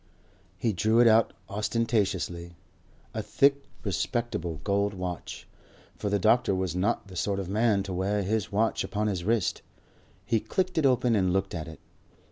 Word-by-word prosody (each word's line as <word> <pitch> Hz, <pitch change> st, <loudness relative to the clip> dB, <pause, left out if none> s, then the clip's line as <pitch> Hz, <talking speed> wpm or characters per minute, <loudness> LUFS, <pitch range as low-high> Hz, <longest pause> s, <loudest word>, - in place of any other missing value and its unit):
He 110 Hz, +2 st, 0 dB
drew 110 Hz, +5 st, +2 dB
it 120 Hz, -, +7 dB
out 115 Hz, 0 st, +5 dB, 0.2 s
ostentatiously, 100 Hz, -5 st, -1 dB, 0.6 s
a -, -, -2 dB
thick, 140 Hz, 0 st, +2 dB, 0.2 s
respectable 100 Hz, -, -2 dB
gold 100 Hz, 0 st, 0 dB
watch, 90 Hz, -2 st, -6 dB, 0.5 s
for 105 Hz, -, -3 dB
the 100 Hz, -, +2 dB
doctor 110 Hz, +1 st, +3 dB
was 95 Hz, -2 st, -2 dB
not 95 Hz, +2 st, 0 dB
the 95 Hz, -, -11 dB
sort 100 Hz, +2 st, -1 dB
of 95 Hz, -, -4 dB
man 105 Hz, 0 st, +2 dB
to 95 Hz, -1 st, -5 dB
wear 100 Hz, +3 st, 0 dB
his 105 Hz, +1 st, -1 dB
watch 110 Hz, +3 st, +1 dB
upon 105 Hz, +1 st, -2 dB
his 95 Hz, -5 st, -1 dB
wrist. 110 Hz, 0 st, 0 dB, 0.6 s
He 115 Hz, +1 st, +2 dB
clicked 185 Hz, -, -1 dB
it 145 Hz, -, +4 dB
open 125 Hz, -2 st, +2 dB
and 95 Hz, -3 st, +2 dB
looked 95 Hz, +1 st, 0 dB
at 85 Hz, -2 st, -4 dB
it. 80 Hz, -, -10 dB
100 Hz, 165 wpm, -28 LUFS, 95-115 Hz, 0.6 s, it